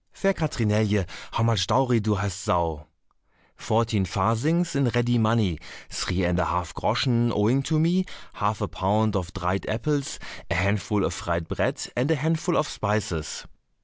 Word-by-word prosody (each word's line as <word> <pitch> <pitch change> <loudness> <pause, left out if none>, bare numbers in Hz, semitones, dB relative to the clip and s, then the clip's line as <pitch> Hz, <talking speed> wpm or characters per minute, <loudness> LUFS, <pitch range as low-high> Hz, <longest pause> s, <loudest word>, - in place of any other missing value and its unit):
"Fair 195 0 +1
Katrinelje, 105 - +1 0.3
how 115 - +1
much 110 -5 +2
dowry 125 -1 +3
do 105 0 +1
hast 100 -1 -3
thou?" 80 -3 0 0.7
"Fourteen 110 -2 +1
farthings 115 - +1
in 140 -2 +2
ready 120 0 +2
money, 110 -7 +2 0.3
three 90 +1 -1
and 90 0 +1
a 90 - +2
half 85 +1 -2
groschen 120 -2 +1
owing 115 +6 +2
to 155 +3 0
me, 175 +4 +2 0.3
half 105 0 -1
a - - 0
pound 105 +3 +1
of 90 -2 -2
dried 90 +1 -2
apples, 140 +5 -1 0.3
a - - 0
handful 100 +2 +1
of - - -1
fried 85 -1 -3
bread, - - -1
and 125 +4 +1
a 160 - +4
handful 160 +4 0
of 150 - +1
spices. 100 - -2
110 Hz, 160 wpm, -25 LUFS, 95-130 Hz, 0.7 s, a